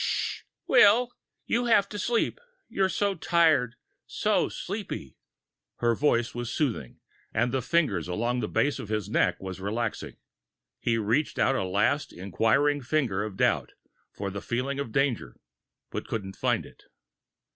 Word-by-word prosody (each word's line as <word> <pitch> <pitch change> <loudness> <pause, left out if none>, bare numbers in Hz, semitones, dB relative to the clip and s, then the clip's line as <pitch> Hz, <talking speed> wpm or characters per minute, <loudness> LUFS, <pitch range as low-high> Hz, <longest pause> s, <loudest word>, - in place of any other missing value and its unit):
"Shh, - - -1 0.2
Will. 245 0 +6 0.3
You 240 +1 +1
have 215 -4 +4
to 210 - -5
sleep. 235 - 0 0.3
You're 190 -1 +1
so 200 +1 +1
tired, 160 -8 +3 0.3
so - - +1
sleepy...." 65 - -6 0.6
Her 120 -1 +2
voice 120 -2 +1
was 120 0 -4
soothing, 120 - -2 0.4
and 120 +3 +2
the 130 0 0
fingers 125 - +1
along 120 +7 -1
the 110 - -1
base 140 +6 +1
of 105 - -7
his 105 -2 -2
neck - - +2
was 95 -1 -7
relaxing. 110 +3 -3 0.6
He 115 -1 +1
reached 115 +8 0
out 135 - +3
a 130 - 0
last 140 +10 +1
inquiring 115 - +1
finger 125 -7 0
of 105 -3 -6
doubt - - +1 0.4
for 100 -1 -5
the 100 +1 -5
feeling 130 +4 -2
of 140 -5 -3
danger, 125 - 0 0.6
and - - -4
couldn't 95 -3 -4
find - - 0
it. - - -17
120 Hz, 150 wpm, -27 LUFS, 105-150 Hz, 0.6 s, Will